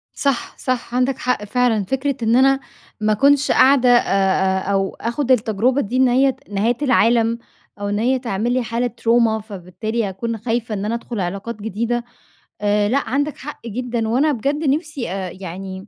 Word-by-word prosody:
صح، 275 -3 -1
صح، 250 -2 -3
عندك 255 +1 +1
حق 250 -4 -1
فعلًا 225 -2 +1
فكرة 270 +5 -1
إن 225 +2 +3
أنا 270 +1 +4 0.4
ما 215 0 +2
أكونش 280 +5 +3
قاعدة 260 -2 +5
أ 245 0 +7 0.7
أ 200 - +1
أو 195 -1 0
آخد 245 +3 -2
التجربة 245 +2 +2
دي 245 +1 -3
إن 260 -1 +4
هي 265 +2 +3
نهاية 215 +4 +1
العالم، 235 -3 +3 0.4
أو 205 - -2
إن 205 +1 -1
هي 255 +4 +2
تعمل 235 -1 -2
لي 255 0 +1
حالة 235 +2 -1
تروما، 230 -1 +1
فبالتالي 210 +2 -4
أكون 225 +4 -4
خايفة 225 0 -2
إن 200 0 -3
أنا 220 - -1
أدخل 235 -2 -5
علاقات 200 +4 -4
جديدة. 235 +3 -2 0.6
آآ 205 0 +2
لأ 260 -1 0
عندك 285 +2 -1
حق 280 -4 -9
جدًا، 235 0 -2
وأنا 275 +6 +2
بجد 285 +4 -1
نفسي 295 - -2
آآ 190 -1 -4
يعني 190 +2 -7
235 Hz, 175 wpm, -20 LUFS, 210-255 Hz, 0.7 s, أ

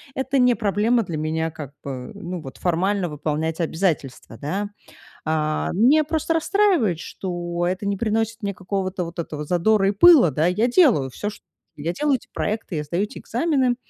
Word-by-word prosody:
Это 265 +1 0
не 250 -1 +5
проблема 220 +2 +1
для 165 -4 -5
меня, 160 +1 -1
как 145 -3 -9
бы, 130 -2 -6
ну 175 0 -6
вот, 135 -3 -9
формально 185 +2 0
выполнять 155 +2 -2
обязательства, 160 -9 -2
да. 195 - -3 0.6
А, 155 -1 0
меня 260 - +5
просто 320 +1 -1
расстраивает, 330 - +2
что 175 -2 -4
это 185 +3 -2
не 200 0 0
приносит 225 +1 -1
мне 200 -1 -1
какого-то, 185 0 -3
вот 170 +1 -9
этого 150 -2 -4
задора 195 +5 +2
и - - +3
пыла, 275 - +7
да. 155 +5 +1
Я 210 +7 +2
делаю 240 - +4
всё 205 +10 -4
чт 210 - -12 0.4
я 165 +4 -2
делаю 290 +7 +1
эти - - -21
проекты, 215 -4 -3
я 150 - -2
сдаю 170 +6 -1
эти 210 - -6
экзамены, 260 -1 +1
185 Hz, 175 wpm, -23 LUFS, 160-225 Hz, 0.6 s, пыла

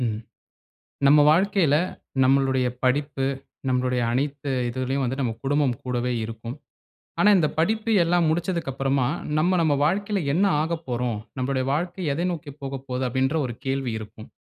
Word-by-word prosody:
ம். 110 -3 -1 0.9
நம்ம 145 +2 +7
வாழ்க்கையில 180 -2 +3 0.5
நம்மளுடைய 135 -1 +3 0.2
படிப்பு, 140 +1 +1 0.4
நம்மளுடைய 125 -1 +1
அனைத்து 140 +2 -2 0.2
இதுலயும் 130 +2 -2
வந்து 130 +2 -2
நம்ம 120 -4 0
குடும்பம் 140 -3 +1
கூடவே 125 0 -1
இருக்கும். 115 +2 -7 0.6
ஆனா, 205 - +5
இந்த 155 -3 +2
படிப்பு 220 +7 +1
எல்லாம் 170 0 +2
முடிச்சதுக்கு 170 -2 -1
அப்பறமா, 135 -1 0 0.3
நம்ம 180 +4 +2
நம்ம 155 -3 +3
வாழ்க்கையில 200 +5 0
என்ன 185 +7 +3 0.2
ஆகப் 165 +1 -3
போறோம்? 120 -2 -1 0.2
நம்மளுடைய 130 0 0
வாழ்க்கை 175 +5 -2
எதை 170 +5 -1
நோக்கி 155 -4 -7
போகப்போது 135 -1 -4
அப்டின்ற 130 +4 0
ஒரு 120 - -6
கேள்வி 135 -2 -1
இருக்கும். 110 0 -11
135 Hz, 140 wpm, -24 LUFS, 125-160 Hz, 0.9 s, நம்ம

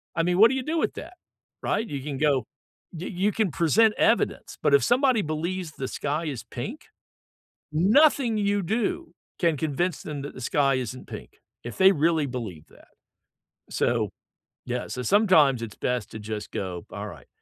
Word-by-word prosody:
I 165 - +1
mean, 180 +1 +1
what 225 - +8
do 265 - -1
you 260 - -2
do 320 +4 -2
with - - 0
that? 345 +3 -9 0.5
Right? 225 +1 -1
You 140 -2 -5
can 140 -1 -5
go 145 -3 +2 0.5
you 170 +2 -6
you 200 +3 0
can 205 -4 0
present 210 +9 +3
evidence, - - +1
but - - +2
if 425 - +6
somebody 255 -2 +3
believes 165 +2 -3
the 135 -3 -5
sky 150 +3 -2
is 135 -6 -4
pink, - - -7 0.9
nothing 230 - +4
you 200 -1 +1
do 325 - -2 0.3
can 170 -3 +2
convince 160 +3 -1
them 145 -2 -6
that 145 - -7
the 130 - -10
sky 140 +1 +2
isn't 130 0 -5
pink, - - -9 0.3
if 120 - -7
they 190 +1 +7
really 160 -2 +2
believe 110 - -6
that. - - -20 0.8
So - - +1 0.6
yeah, 125 0 -3
so 125 - -5
sometimes 160 - +4
it's 110 -3 -6
best 125 -3 -2
to 110 - -7
just 105 0 -6
go, 90 -3 -4
"Alright." 100 -9 -8
160 Hz, 175 wpm, -26 LUFS, 130-210 Hz, 0.9 s, what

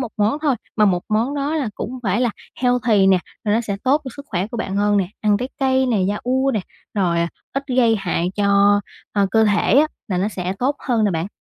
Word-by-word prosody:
1 250 - -2
món 215 +7 +1
thôi, 290 -4 +2 0.2
mà 215 - +5
1 180 -3 +2
món 230 +7 0
đó 285 +2 -1
là 280 -7 -1
cũng 255 +4 -5
phải 205 +1 0
là 245 -2 +2 0.3
healthy 240 -5 +3
nè, 190 -1 +5 0.3
rồi 210 -1 +2
nó 230 - +2
sẽ 205 -4 -3
tốt 280 +4 +3
cho - - -5
sức 280 0 -10
khỏe 180 +1 -1
của 235 - -7
bạn 195 -4 -3
hơn 205 0 +2
nè. 190 -3 +1
Ăn 210 -1 +3
trái 250 +4 -3
cây 265 0 +2
nè, 230 -5 +1
yaourt 260 +5 0
nè, 215 - +1 0.3
rồi 180 -5 +1 0.3
ít 275 +1 -2
gây 230 -3 +4
hại 180 -3 -1
cho, 200 0 +4 0.3
ơ, 200 -1 +2
cơ 220 0 +4
thể 210 +3 +2
á 310 - +5 0.2
là 185 -3 -1
nó 195 +3 +1
sẽ 185 -3 -3
tốt 275 +4 0
hơn 235 -5 0
nè 205 - +2
bạn. 165 0 -2
215 Hz, 240 wpm, -20 LUFS, 200-255 Hz, 0.3 s, mà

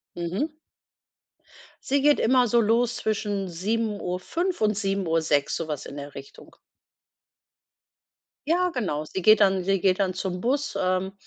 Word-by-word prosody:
Mhm. 185 - -3 1.3
Sie 280 +1 +1
geht 295 +1 +4
immer 250 +1 +4
so 235 +2 +3
los 235 +2 +2
zwischen 205 -3 -2
7:05 210 - -2
und 215 0 +3
7:06, 165 -8 0
so 165 - -4
was 150 -3 -4
in 140 - -9
der 145 0 -8
Richtung. 140 0 -12 1.9
Ja, 360 +3 +2
genau. 155 - -2
Sie 190 - -5
geht 215 +3 +6
dann 190 -2 +3
sie 195 +1 +1
geht 185 +1 +2
dann 185 -2 0
zum 185 -1 -4
Bus, 280 +4 -1
ähm, 185 +1 0
195 Hz, 140 wpm, -25 LUFS, 180-235 Hz, 1.9 s, geht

